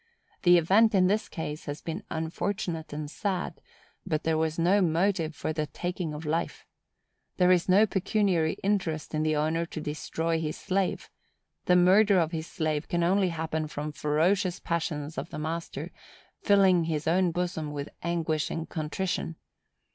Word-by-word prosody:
The 175 -2 +6
event 200 +6 +4
in 185 -1 +5
this 210 +4 +1
case 155 -2 -5
has 145 0 -5
been 170 +5 -5
unfortunate 165 +1 -3
and 150 0 -4
sad; 185 +4 -3 0.4
but 155 0 -2
there 160 0 +1
was 160 0 0
no 180 +5 +3
motive 170 -1 +1
for 155 - -3
the 155 -1 -2
taking 175 +1 -4
of 150 +1 -7
life. 160 +3 -2 0.7
There 180 0 +5
is 180 0 +3
no 200 +4 +6
pecuniary 195 -4 +1
interest 180 -7 -1
in 155 - 0
the 155 0 +1
owner 160 +3 +1
to 160 - -6
destroy 160 +2 -2
his 155 -1 -3
slave; 190 -1 -1 0.5
the 180 - +4
murder 190 +3 +5
of 165 -2 +2
his 160 -1 -4
slave 155 -2 -2
can 175 0 0
only 190 +2 +3
happen 160 -1 -2
from 150 0 -5
ferocious 175 +6 +1
passions 160 -3 -3
of - - -6
the - - -7
master, 160 +2 -4 0.5
filling 190 -4 +4
his 155 -2 -2
own 180 +2 +3
bosom 170 -3 -2
with 145 0 -5
anguish 165 -3 -1
and 165 0 -4
contrition. 165 +1 -3
165 Hz, 160 wpm, -28 LUFS, 155-185 Hz, 0.7 s, The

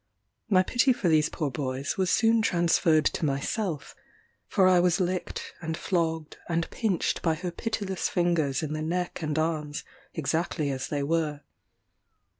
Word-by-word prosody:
My 185 -3 +5
pity 250 +6 +3
for 185 -7 0
these 155 -1 +4
poor 150 -4 -2
boys 130 +1 -3
was 190 -1 0
soon 225 +2 +4
transferred 170 -5 +3
to - - 0
myself; 150 +3 -2 0.5
for 190 -2 +4
I 185 -1 +6
was 175 -1 +3
licked, 185 0 -2
and 160 -1 -3
flogged, 165 -4 -1
and 165 -1 0
pinched 210 -7 0
by 160 -2 +1
her 180 +2 -4
pitiless 200 -1 -2
fingers 165 -6 +1
in 155 -1 -3
the 155 - -3
neck 175 +3 -2
and 155 -1 -2
arms, 155 -2 -1 0.3
exactly 160 -1 -1
as 135 -1 -3
they 145 -2 -2
were. 150 -1 0
165 Hz, 155 wpm, -27 LUFS, 150-180 Hz, 0.5 s, I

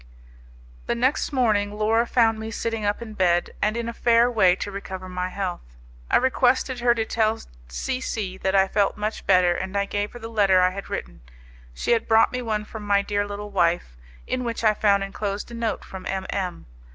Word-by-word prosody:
The - - 0
next 260 +6 +1
morning 210 -6 +1
Laura 225 +2 +2
found 225 -3 +3
me 220 0 -5
sitting 225 -1 -3
up 205 +3 -1
in 220 -2 -9
bed, 175 -3 +1
and 215 +2 +1
in 235 -1 -3
a 235 - -4
fair 235 +1 +3
way 190 -6 +4
to 205 - -5
recover 190 -1 -7
my 180 0 -3
health. 180 - -5 0.3
I - - +5
requested 260 0 +2
her 240 0 +3
to 225 -1 -1
tell 220 0 +1 0.3
C 255 - -3
C 200 -7 -3
that 190 +1 0
I 195 0 +5
felt 200 +1 +1
much 210 +1 -4
better, 180 -2 +5
and 190 +3 -4
I 200 - +1
gave 205 +1 -3
her - - -8
the 225 - -7
letter 200 -4 +3
I 180 0 +4
had 195 +1 -7
written. - - -6 0.5
She - - -2
had 230 -1 +2
brought 225 0 +5
me 250 - -3
one 215 -3 -2
from 220 0 -8
my 200 -1 +2
dear 205 0 -1
little 205 0 -6
wife, 170 - +1 0.3
in 255 - -2
which 230 -1 -3
I 215 -1 +5
found 200 -1 +2
enclosed 200 +2 -4
a - - -8
note 230 -1 -3
from 190 -1 -8
M 190 0 -3
M 185 -3 -3
210 Hz, 215 wpm, -24 LUFS, 190-230 Hz, 0.5 s, I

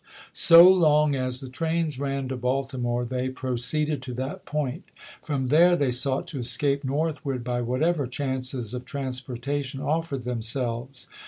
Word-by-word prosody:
So 170 0 +8
long 150 -5 +5
as 130 -1 -2
the 135 - -7
trains 160 +1 -2
ran 140 -1 -2
to 130 - -2
Baltimore, 125 -1 -1
they 130 +1 -2
proceeded 130 +3 -1
to 130 -2 -6
that 135 +10 -5
point; 150 +1 -3 0.4
from 135 -4 -2
there 170 +5 +6
they 140 -6 +1
sought 130 +2 0
to 140 - -5
escape 140 +4 0
north 150 +3 -1
ward 130 -4 -3
by 120 0 -2
whatever 140 +5 0
chances 130 -3 -3
of 125 0 -4
transportation 135 +1 -4
of 155 +3 -1
fered 135 -3 -4
themselves. 120 +2 -3
135 Hz, 155 wpm, -25 LUFS, 125-150 Hz, 0.4 s, So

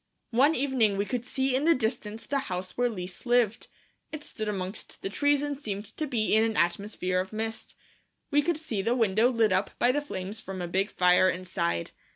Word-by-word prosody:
One 275 +7 +4
evening 245 -7 +2
we 200 - 0
could 245 +1 -3
see 265 0 0
in 275 +3 +1
the 335 - +6
distance 220 -2 -3
the 280 - 0
house 180 0 -4
where 245 0 +2
Lise 185 +1 -7
lived. 240 -3 +2 0.4
It 310 -1 -6
stood 215 -6 -5
amongst 190 0 -5
the 195 - -3
trees 285 +4 +2
and 290 -1 -3
seemed 205 -6 -4
to 310 - -2
be 230 -6 0
in 220 +1 +5
an 225 0 0
atmosphere 185 +1 0
of 185 +1 -3
mist. 220 +1 -5 0.6
We 290 0 +4
could 330 +1 0
see 250 -11 -3
the 230 +5 +1
window 225 0 +3
lit 225 -5 +2
up 185 +2 +1
by 245 - +4
the 290 +3 0
flames 200 -6 -5
from 190 -2 -7
a 175 - -3
big 190 +3 0
fire 180 +1 +4
inside. 85 - -2
220 Hz, 205 wpm, -28 LUFS, 190-260 Hz, 0.6 s, the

